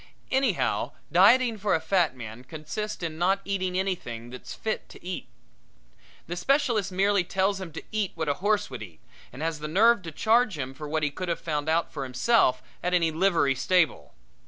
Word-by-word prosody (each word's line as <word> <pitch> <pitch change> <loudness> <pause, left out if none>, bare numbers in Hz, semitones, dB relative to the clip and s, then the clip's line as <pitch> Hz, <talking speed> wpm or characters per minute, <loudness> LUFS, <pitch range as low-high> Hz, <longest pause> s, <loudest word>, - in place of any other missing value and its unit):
Anyhow, 260 -7 +1 0.2
dieting 225 +5 +5
for 200 -2 +2
a - - +1
fat 160 -3 +1
man 115 -1 -9
consists 160 +9 -5
in 160 -1 -4
not 190 +3 +3
eating 185 -2 -1
anything 120 -12 -3
that's 125 - -9
fit 220 -1 -3
to - - -14
eat. 180 -8 -5 1.0
The 175 - -5
specialist 235 -2 +1
merely 195 +1 +2
tells 195 +2 0
him 180 -3 -6
to - - -7
eat 215 -3 -1
what 160 -2 -3
a 145 - +2
horse 205 -4 +1
would 130 - -6
eat 90 -7 -10 0.3
and 135 +5 -7
has 165 -2 -2
the 150 - -4
nerve 215 +7 +4
to 165 -2 -7
charge 220 +3 +2
him 135 -2 -4
for 150 +2 -8
what 155 0 -1
he 150 - +1
could 180 +4 -5
have 170 - -1
found 150 -2 -2
out 165 +1 +1
for 145 - -4
himself 130 - +2 0.2
at 180 0 +1
any 165 -2 +2
livery 165 -4 +2
stable. 160 +6 +1
175 Hz, 195 wpm, -27 LUFS, 150-200 Hz, 1.0 s, dieting